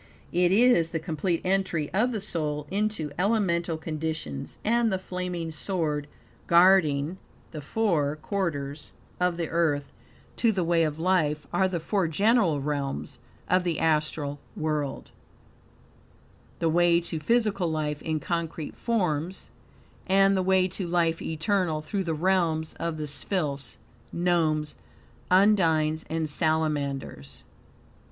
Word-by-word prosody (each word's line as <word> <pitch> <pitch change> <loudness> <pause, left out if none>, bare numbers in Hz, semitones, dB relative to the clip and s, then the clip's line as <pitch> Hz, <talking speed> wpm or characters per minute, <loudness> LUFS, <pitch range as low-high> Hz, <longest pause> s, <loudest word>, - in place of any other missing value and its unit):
It 175 0 +3
is 205 -6 +5
the 165 - -2
complete 165 +1 -2
entry 185 -5 0
of 225 +6 +2
the 220 - -2
soul 150 -7 -2
into 200 -7 -1
elemental 180 -5 +1
conditions, 155 - -4
and 230 +1 +2
the 190 - +1
flaming 180 -3 -4
sword 155 -4 -2 0.4
guarding 170 -2 +4 0.3
the 155 - -6
four 155 -4 0
quarters 150 -5 -4 0.3
of 180 -1 +1
the 170 -2 -2
Earth 150 -4 0 0.4
to 230 - +3
the 190 -4 -1
way 170 0 +2
of 150 -1 -3
life 160 -4 +1
are 190 +2 +3
the 180 -2 -2
four 190 +2 0
great 200 +8 +3
realms 145 - -1 0.3
of 185 0 +3
the 170 -3 -1
astral 150 -2 0 0.2
world; 150 -3 -3 1.5
the 165 - 0
way 170 +1 +4
to 170 -1 -3
physical 205 0 +1
life 150 -2 -2
in 160 -1 -2
concrete 165 -2 -3
forms; 180 -6 -2 0.6
and 195 +1 +4
the 190 - +2
way 185 0 +3
to 185 0 -5
life 170 -1 +1
eternal 160 0 0
through 190 +5 -3
the 165 -2 -1
realms 165 -2 +1
of 170 -1 -2
the 155 - -3
Sylphs, 145 -1 -2 0.3
Gnomes, 160 -4 +1 0.5
Undines 165 -5 +3
and 160 -1 -1
Salamanders. 145 - -1
165 Hz, 130 wpm, -27 LUFS, 155-185 Hz, 1.5 s, is